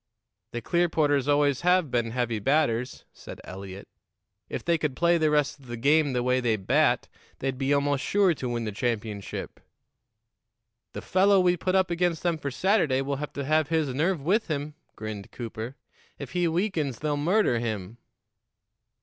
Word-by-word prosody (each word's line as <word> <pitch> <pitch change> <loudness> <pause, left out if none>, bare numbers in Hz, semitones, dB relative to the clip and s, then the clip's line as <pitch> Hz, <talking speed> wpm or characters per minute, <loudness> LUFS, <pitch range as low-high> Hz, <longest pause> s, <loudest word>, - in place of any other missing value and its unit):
"The 120 -1 -5
Clearporters 155 -5 +1
always 145 -2 +2
have 180 -4 +3
been 120 -1 0
heavy 120 -2 -1
batters," 130 0 0
said - - -11
Eliot. 95 +1 -9 0.6
"If - - -5
they 170 -1 +2
could 150 -4 -2
play 170 +2 +3
the 155 -1 +3
rest 150 -1 +1
of 135 - -17
the 120 0 -5
game 145 +3 +3
the 125 -1 0
way 125 +1 +2
they 120 -3 +1
bat, 95 -3 +2 0.3
they'd 135 -1 -2
be 135 +1 0
almost 145 -1 +1
sure 195 -3 +3
to 130 -4 -5
win 120 -1 -2
the 110 - -3
championship." 105 -2 -4 1.3
"The - - -6
fellow 195 +1 +4
we 180 -1 +3
put 185 +2 -1
up 190 -2 +2
against 170 -1 0
them 170 -2 0
for 140 - -3
Saturday 155 - +1
will 140 0 -2
have 150 +1 -6
to 140 - -4
have 155 0 +2
his 160 -5 0
nerve 165 +6 +1
with 205 +8 +1
him," 150 -1 -3 0.2
grinned 110 -2 -7
Cooper. 115 +1 -6 0.4
"If 140 -3 -8
he 175 -1 +1
weakens, 165 - -1
they'll 150 -1 -1
murder 155 - +2
him." 110 -2 -4
145 Hz, 175 wpm, -27 LUFS, 120-170 Hz, 1.3 s, fellow